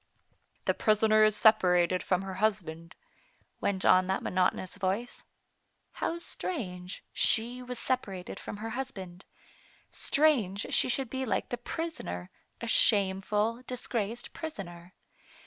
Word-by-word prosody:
" - - -43
The - - +3
prisoner 215 0 +4
is 215 -1 +4
separated 180 -4 +4
from 185 0 0
her 190 -1 -5
husband," 170 -6 -1 0.6
went 195 -1 -1
on 185 0 +5
that 190 - -1
monotonous 185 0 0
voice. 200 +5 -2 0.7
How 335 - -2
strange, 185 - -5
sAe 240 +2 +2
was 250 0 -6
separated 195 -9 -3
from - - -7
her 225 +2 -5
husband; 195 -9 -6 0.7
strange 235 -10 +2
she - - +3
should 255 -1 0
be 265 0 -2
like 220 -7 -1
the - - -1
prisoner^ 240 - -5 0.3
a - - -3
shameful, 210 +1 +3
disgraced 240 -2 -3
prisoner. 180 - -8
210 Hz, 125 wpm, -30 LUFS, 185-240 Hz, 0.7 s, on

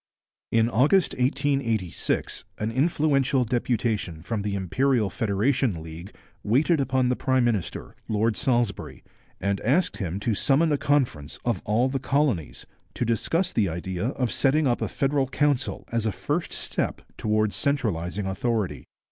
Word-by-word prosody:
In 115 0 +3
August 140 - +3
1886 125 - 0
an 110 +1 -2
influential 140 -1 +2
deputation 110 -8 -1
from 110 +2 -2
the 100 0 -2
Imperial 110 +4 +1
Federation 110 -1 +1
League 80 +5 -9 0.3
waited 145 +9 +3
upon 130 -1 +1
the 125 - +2
prime 130 -1 +1
minister, 110 -7 -2
Lord 110 +1 +1
Salisbury, 120 -6 -1 0.4
and 100 0 -1
asked 150 - +1
him 95 -2 -3
to 115 +1 +1
summon 150 +9 +2
a 145 - +2
conference 120 - 0
of 115 -7 0
all 115 +5 +2
the 135 0 -2
colonies 135 - 0 0.3
to - - -1
discuss 165 - 0
the 100 -5 +2
idea 90 +4 -3
of 125 -2 -1
setting 150 +3 +2
up 120 -3 +1
a - - 0
federal 135 -1 0
council 140 -1 0
as 115 -1 0
a - - +1
first 150 - -2
step - - -3
towards 110 -1 0
centralizing 105 - -1
authority. 95 - -2
120 Hz, 145 wpm, -25 LUFS, 100-135 Hz, 0.4 s, In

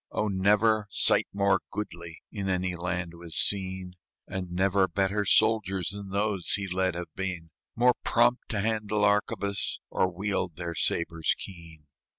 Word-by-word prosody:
Oh, 105 - -1
never 105 +2 +3
sight - - +4
more 100 -1 +2
goodly 85 -5 -6
In 100 -2 -3
any 90 -1 0
land 85 0 -3
was 85 -2 -9
seen; 95 -1 -1 0.3
And 95 -2 -4
never 95 +1 +2
better 100 +2 0
soldiers 100 -4 +2
Than 100 -1 -6
those 100 -2 -1
he 100 -1 -1
led 95 -1 0
have 85 0 -6
been, 90 -4 -4 0.2
More 125 +1 +5
prompt 120 +1 +2
to 105 -3 -1
handle 105 -1 +1
arquebus, 100 -1 0
Or 95 - +1
wield 95 -2 -2
their 85 0 -4
sabres 85 0 0
keen. 85 -5 -11
95 Hz, 150 wpm, -28 LUFS, 90-105 Hz, 0.3 s, More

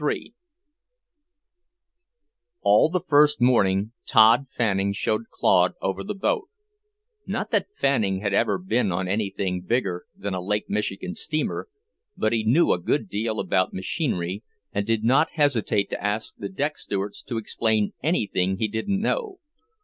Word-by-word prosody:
III 150 - -2 2.3
All 105 +8 +5
the 180 +1 -1
first 150 0 +5
morning 105 -4 +3 0.2
Tod 115 +3 +6
Fanning 100 -5 0
showed 110 +2 -1
Claude - - +3
over 95 0 -2
the 95 - -4
boat, 415 - -1 0.8
not - - -3
that - - +1
Fanning 105 -9 +1
had 100 -1 -1
ever - - +2
been 180 - 0
on 90 +2 -1
anything 95 -2 -1
bigger 95 -3 -1
than 100 -1 -4
a 90 - -2
Lake 105 +3 -1
Michigan 95 -3 -2
steamer, 155 -1 -3 0.5
but 110 - +1
he 115 -1 +1
knew 130 +11 +4
a - - +2
good 110 - -1
deal 110 +2 -2
about 95 -1 +1
machinery, 95 - -2 0.3
and 100 0 -1
did 115 -1 +1
not 130 +7 +3
hesitate 125 -9 +1
to - - -4
ask 105 +2 -2
the 100 - -6
deck 145 +10 -2
stewards 100 0 -4
to 120 - -5
explain 110 -1 0
anything 100 - 0
he 110 - 0
didn't 115 - -2
know. 420 - -1
110 Hz, 150 wpm, -24 LUFS, 100-135 Hz, 2.3 s, Tod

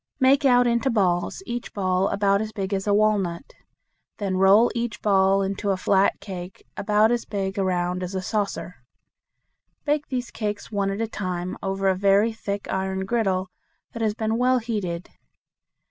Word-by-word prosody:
Make 275 +2 +4
out 245 -2 +5
into 235 +2 +1
balls, 190 - 0
each 240 0 -5
ball 185 -1 +1
about 200 0 +2
as 220 0 -4
big 195 -2 -4
as 195 +1 -2
a - - +3
walnut. 205 -2 0 0.6
Then 195 -3 -2
roll 195 +5 +5
each 235 -1 -3
ball 195 -1 +3
into 200 +1 -2
a 195 - +1
flat 195 +1 +2
cake 185 -2 -8
about 210 +2 +3
as 240 -1 0
big 195 -1 -3
around 180 -1 0
as 180 +1 -5
a 190 - -1
saucer. 200 -3 -3 1.1
Bake 295 0 0
these 250 -2 -4
cakes 210 -1 -4
one 200 -2 0
at 195 +3 -3
a 225 - 0
time 185 -4 -4
over 195 0 -1
a 190 - +4
very 200 +4 +3
thick 200 -2 -4
iron 190 0 -2
griddle 195 -4 0 0.4
that 230 - -6
has 215 -2 0
been 220 +1 -1
well 255 +1 +3
heated. 205 -8 -3
200 Hz, 170 wpm, -24 LUFS, 190-225 Hz, 1.1 s, out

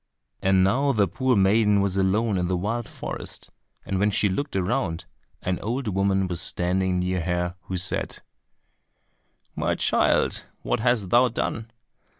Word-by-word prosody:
And 95 -1 +3
now 135 +8 +2
the 105 -4 +2
poor 130 +3 +1
maiden 105 +1 +4
was 100 -1 0
alone 100 +2 +1
in 90 - 0
the 90 0 0
wild 110 +6 -3
forest, - - -8 0.3
and 95 - -2
when 105 +2 +3
she 105 0 +2
looked 140 +8 -3
around, 95 -3 -1 0.4
an 90 0 -1
old 120 +2 -2
woman 95 0 +1
was 90 -1 -3
standing 90 +1 0
near 90 0 -1
her 90 0 -1
who 95 - -3
said, 90 +2 -2 1.3
"My - - 0
child, - - +2 0.2
what - - 0
hast 120 -7 +1
thou 120 +2 +6
done? 115 -1 -3
95 Hz, 150 wpm, -25 LUFS, 90-115 Hz, 1.3 s, thou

